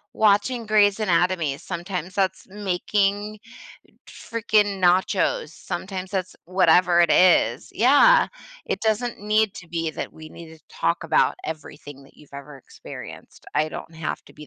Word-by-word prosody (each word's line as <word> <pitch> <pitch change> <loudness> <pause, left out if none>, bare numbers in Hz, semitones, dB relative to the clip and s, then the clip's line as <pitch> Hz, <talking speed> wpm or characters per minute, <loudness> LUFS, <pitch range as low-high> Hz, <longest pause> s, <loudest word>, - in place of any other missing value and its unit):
watching 220 +3 +2
Grey's 205 -1 +3
Anatomy, 175 -7 +1
sometimes 180 +2 -6
that's 190 -1 -1
making 205 +2 -1 0.7
freaking 215 -3 0
nachos, 185 - +2
sometimes 190 0 -6
that's 185 -2 -3
whatever 180 -1 +3
it 170 -2 +3
is. 120 -12 +3
Yeah. 290 - +5 0.4
It - - -3
doesn't 225 +2 -1
need 215 0 +1
to 175 - -11
be 165 -1 -2
that - - -6
we 155 0 -12
need 160 0 -12
to - - -26
talk 170 - -1
about 165 - +2
everything 145 -3 -9
that 135 - -22
you've 150 - -19
ever 140 +1 -10
experienced. 135 - -12
I 155 - +1
don't 160 - -9
have 160 -1 -4
to - - -16
be 150 - -13
185 Hz, 145 wpm, -23 LUFS, 165-210 Hz, 0.7 s, Yeah